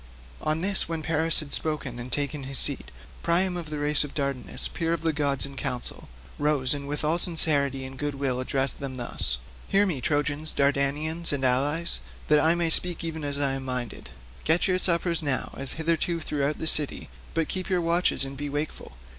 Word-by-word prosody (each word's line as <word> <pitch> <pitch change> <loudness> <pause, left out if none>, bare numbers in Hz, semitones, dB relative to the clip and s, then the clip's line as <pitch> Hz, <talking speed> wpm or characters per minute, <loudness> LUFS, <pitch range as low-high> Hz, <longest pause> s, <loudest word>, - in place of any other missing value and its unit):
On 155 +1 -1
this, 195 -2 +2
when 165 -1 -4
Paris 160 +1 +4
had 145 -2 -7
spoken 145 -6 -3
and 120 +1 -7
taken 145 -1 0
his 135 0 -2
seat, 140 - +3 0.3
Priam 180 +2 +1
of 170 -3 -6
the 155 - -5
race 145 0 +3
of 145 - -9
Dardanus, 140 -3 -1
peer 165 0 -2
of 170 - -4
gods 140 -3 -1
in 140 0 -11
council, 125 -2 -4 0.3
rose 145 -3 +2
and 140 -1 -6
with 145 +1 -3
all 160 +3 +1
sincerity 140 -6 +4
and 130 0 -10
goodwill 140 -3 -2
addressed 135 +1 -1
them 135 -2 -5
thus: 120 - -1 0.3
"Hear 200 +1 +3
me, 160 -10 -3
Trojans, 145 +2 0
Dardanians, 145 +4 +1
and 140 -2 -1
allies, 145 +7 +1 0.3
that 150 0 +5
I 160 +2 +3
may 170 -1 0
speak 175 0 +1
even 160 -2 -5
as 140 -1 -2
I 140 -1 +1
am 135 0 -4
minded. 125 - -4 0.3
Get 165 +6 +2
your 185 -1 +1
suppers 170 -1 +1
now 140 -4 -2
as 135 -1 0
hitherto 165 +1 -1
throughout 150 -2 -2
the - - -5
city, 150 -2 +4 0.3
but 165 -1 0
keep 185 0 -4
your 185 -1 +1
watches 170 -3 +1
and 135 0 -8
be 145 +1 -5
wakeful. 145 +2 -5
150 Hz, 195 wpm, -25 LUFS, 140-165 Hz, 0.3 s, that